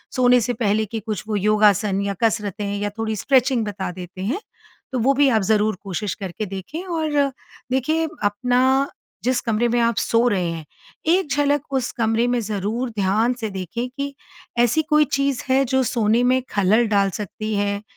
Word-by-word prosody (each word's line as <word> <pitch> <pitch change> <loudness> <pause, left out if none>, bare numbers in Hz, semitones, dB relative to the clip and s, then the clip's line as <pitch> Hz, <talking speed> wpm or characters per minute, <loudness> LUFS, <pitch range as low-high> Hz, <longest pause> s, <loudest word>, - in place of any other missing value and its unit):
सोने 250 -1 +5
से 245 +3 -1
पहले 220 -2 +1
के 225 +2 -5
कुछ 215 -1 -4
वो 215 - -1
योगासन 205 -1 +3
या 200 0 -1
कसरतें 205 -2 0
या 205 0 -1
थोड़ी 220 -1 -1
स्ट्रेचिंग 255 +1 +2
बता 195 -3 -4
देते 180 +1 -9
हैं। 250 - -1 0.5
तो 255 - -1
वो 265 +4 +3
भी 280 0 +4
आप 225 -4 +3
ज़रूर 215 +1 +2
कोशिश 200 +1 -3
करके 195 +2 -5
देखें 195 - -6
और, 305 -5 0 0.4
देखिए 315 +5 +1 0.2
अपना, 250 +6 +2 0.4
जिस 255 0 +1
कमरे 230 +1 +1
में 240 - +1
आप 230 0 +2
सो 230 +1 +2
रहे 180 -6 0
हैं, 165 -2 -6 0.4
एक 345 0 +2
झलक 290 0 +2
उस 255 -2 0
कमरे 225 0 +1
में 245 0 +1
ज़रूर 215 +4 -2
ध्यान 215 +6 +2
से 220 - -2
देखें 195 +6 -4
कि 280 +2 -5 0.5
ऐसी 240 +6 +3
कोई 300 -1 +5
चीज़ 275 -2 0
है 265 +1 +4
जो 265 +1 +1
सोने 230 0 +2
में 255 +1 +3
खलल 210 +4 +3
डाल 200 -2 +3
सकती 215 +2 -4
है? 200 0 -1
225 Hz, 180 wpm, -22 LUFS, 205-260 Hz, 0.5 s, सोने